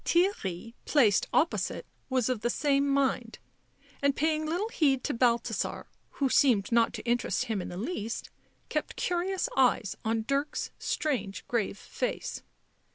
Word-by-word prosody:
Theirry, 230 - 0
placed 230 -10 +4
opposite, 330 - +1 0.2
was 255 -3 +1
of 250 -4 -1
the 240 - +1
same 280 +2 +2
mind 265 -4 +1 0.6
and, 280 -1 +3
paying 310 0 +1
little 360 +8 -1
heed 275 - +2
to - - -1
Balthasar, 235 -1 0 0.3
who 275 - +1
seemed 245 -7 +3
not 230 -1 +4
to - - -6
interest 240 +1 +1
him 220 -5 -2
in - - -6
the 175 - -7
least, 230 - -4 0.4
kept - - -2
curious 360 +2 0
eyes 250 -6 +3
on 225 0 0
Dirk's 280 +2 -1
strange, 250 -10 -2
grave 220 -4 -1
face. - - -4
255 Hz, 145 wpm, -29 LUFS, 230-300 Hz, 0.6 s, placed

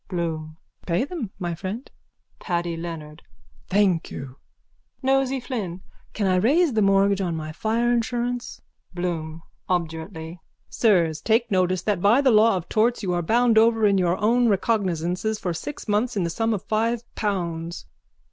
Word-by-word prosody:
BLOOM: 160 -3 -4 0.3
Pay 175 +5 +1
them, 285 - -5
my 175 -3 -3
friend. 195 - -5 0.5
PADDY 170 -2 -2
LEONARD: 165 -2 -7 0.5
Thank 190 -4 +2
you. 135 0 -8 0.7
NOSEY 270 0 +2
FLYNN: 210 -8 -5 0.3
Can 210 - -1
I 185 -1 +3
raise 280 - +3
a 215 - +3
mortgage 195 0 +3
on 175 -3 -1
my 155 -1 -5
fire 225 +8 0
insurance? 240 +1 -2 0.3
BLOOM: 165 -2 -3 0.3
(Obdurately.) 160 -1 -3 0.3
Sirs, 170 -9 +2
take 230 +1 +1
notice 185 -2 +1
that 205 -5 0
by 210 +7 +5
the 275 -2 +4
law 215 -2 +5
of 175 - -6
torts 230 +1 +1
you 180 -2 0
are 175 - 0
bound 230 +5 +4
over 225 -1 +4
in 200 -2 +4
your 180 0 +1
own 235 +3 +3
recognisances 195 -1 0
for 180 -4 -3
six 290 - -7
months 215 +3 0
in 190 - +1
the 170 - -1
sum 225 +5 0
of 195 - -6
five 225 +2 0
pounds. 170 - -3
195 Hz, 155 wpm, -24 LUFS, 170-230 Hz, 0.7 s, by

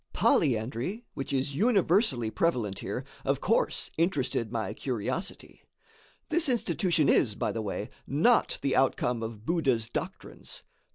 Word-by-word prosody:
Polyandry, 130 - +1
which 135 - -5
is 135 +1 -1
universally 185 - +2
prevalent 120 - 0
here, - - -4 0.2
of - - 0
course - - 0
interested 135 - 0
my 115 -2 -2
curiosity. 130 - -4 0.7
This 320 -2 +2
institution 185 - +1
is, 105 -5 +3
by - - -1
the 115 - -3
way, 105 0 -4 0.2
not 170 - +3
the 135 - +1
outcome 125 -2 +1
of 110 -1 -6
Buddha's 130 -9 +1
doctrines. - - -6
135 Hz, 125 wpm, -29 LUFS, 115-175 Hz, 0.7 s, is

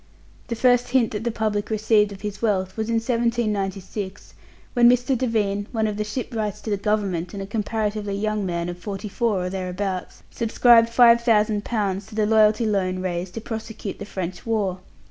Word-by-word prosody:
The 235 - -2
first 245 +1 +3
hint 245 -2 +2
that 210 +1 -4
the - - +2
public 215 -2 -1
received 215 -1 +2
of 195 - -10
his 205 0 -5
wealth 190 -4 0
was 220 0 -3
in 230 - +1
1796, 215 -5 -2 0.4
when 240 -1 +6
Mr. 250 +2 +2
Devine, 210 -5 0
one 220 -2 0
of 210 -1 -2
the 210 - 0
shipwrights 210 -2 -3
to 220 - -5
the 205 - +1
Government, 195 -3 -1
and 195 - -4
a - - -5
comparatively 210 -1 -2
young 215 0 -1
man 170 -2 -2
of 175 0 -6
forty 200 +1 -5
four 205 -2 0
or - - -2
thereabouts, 185 0 -4
subscribed 230 0 +4
five 235 0 +6
thousand 215 -3 +2
pounds 200 -4 -1
to 215 - -11
the 215 -1 +2
Loyalty 215 +1 +4
Loan 190 -3 0
raised 180 0 -3
to 225 - -4
prosecute 225 -2 -6
the 200 - -6
French 185 -3 -5
war. 205 -5 -1
210 Hz, 185 wpm, -23 LUFS, 195-225 Hz, 0.4 s, when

